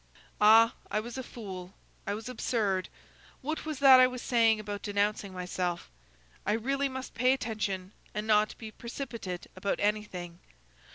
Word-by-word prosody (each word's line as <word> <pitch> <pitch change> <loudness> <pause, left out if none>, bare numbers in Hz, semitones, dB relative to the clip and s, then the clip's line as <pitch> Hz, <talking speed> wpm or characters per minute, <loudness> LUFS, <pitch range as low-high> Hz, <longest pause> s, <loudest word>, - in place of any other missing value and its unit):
Ah! 225 +2 +7 0.2
I 210 - 0
was 235 +2 -6
a - - -1
fool! 190 -7 -8 0.3
I 200 - 0
was 220 +2 -7
absurd! 215 -6 -1 0.5
what 310 +3 -3
was 310 -2 -3
that 265 -1 +8
I 255 - +8
was 250 -1 -6
saying 225 -3 +4
about 205 -1 -5
denouncing 205 -1 0
myself? 180 - -3 0.5
I 210 - +1
really 275 +5 0
must 260 0 -6
pay 250 +3 +3
attention 205 -6 -3 0.2
and 210 0 -3
not 215 -1 +3
be 220 -2 -8
precipitate 230 -6 -6
about 190 +2 -1
anything. 190 -5 -2
215 Hz, 155 wpm, -30 LUFS, 200-245 Hz, 0.5 s, that